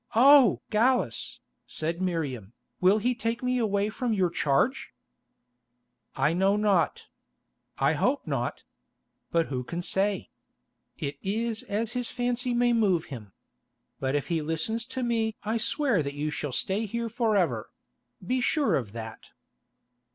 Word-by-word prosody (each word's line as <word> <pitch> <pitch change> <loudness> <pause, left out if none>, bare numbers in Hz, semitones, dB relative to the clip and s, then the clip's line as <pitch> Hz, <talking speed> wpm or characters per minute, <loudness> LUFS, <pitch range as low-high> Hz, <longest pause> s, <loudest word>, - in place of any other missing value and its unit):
"Oh! 270 +1 +7
Gallus," 245 +4 +1 0.3
said 165 +3 -3
Miriam, 140 - -2 0.3
"will 190 +3 +5
he 245 +4 +1
take 230 +1 -3
me 250 0 +1
away 205 -2 +1
from 235 +1 -2
your 185 -4 +1
charge?" 150 - 0 1.2
"I 140 +4 +2
know 190 +3 +3
not. 205 -5 +1 0.7
I - - +3
hope - - 0
not. - - -2 0.7
But 165 -1 +2
who 130 -2 -2
can 170 +7 -5
say? 195 +1 0 0.7
It 140 0 -4
is 220 +3 -2
as 220 +3 -3
his 245 -2 -2
fancy 245 0 -1
may 240 0 +3
move 195 -8 +2
him. 105 -6 -9 0.7
But 135 +1 -1
if 145 - -2
he 165 -2 0
listens 165 +9 -1
to 260 0 -4
me 225 -2 0
I 220 +2 0
swear 240 - +1
that 140 -1 -4
you 150 +1 -2
shall 150 -3 -3
stay 195 - -1
here 235 +2 -3
for 225 -2 +1
ever; 125 - 0 0.6
be 255 +6 0
sure 270 - +2
of 110 -6 -5
that." 110 -1 -8
205 Hz, 145 wpm, -27 LUFS, 160-235 Hz, 1.2 s, Oh